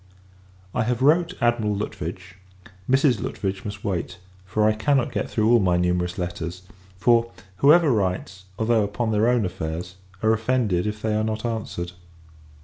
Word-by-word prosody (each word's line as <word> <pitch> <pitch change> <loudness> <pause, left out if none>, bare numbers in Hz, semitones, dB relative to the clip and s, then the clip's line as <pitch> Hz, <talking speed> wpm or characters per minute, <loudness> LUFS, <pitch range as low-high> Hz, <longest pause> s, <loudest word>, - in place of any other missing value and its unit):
I - - 0
have 125 +1 -1
wrote 170 +5 +3
Admiral 120 -3 +2
Lutwidge; 90 -2 -6 0.5
Mrs. 130 -4 +3
Lutwidge 95 -1 -3
must 105 0 -7
wait, 95 -5 -2 0.3
for 105 +3 +1
I 110 - +4
cannot 130 +4 +1
get - - -2
through 110 +1 +2
all 120 - +6
my 90 -3 +2
numerous 90 0 0
letters: 90 0 -4 0.3
for, 115 +3 +3 0.3
whoever 150 - +5
writes, 95 -3 -2
although 110 -1 +2
upon 105 +3 -2
their 110 +1 +2
own 120 -4 +2
affairs, 90 0 -5 0.3
are 110 0 +4
offended 110 -5 0
if 105 0 -5
they 110 -1 0
are 110 0 +1
not 110 +1 -3
answered. 110 -6 -3
105 Hz, 155 wpm, -24 LUFS, 90-120 Hz, 0.5 s, all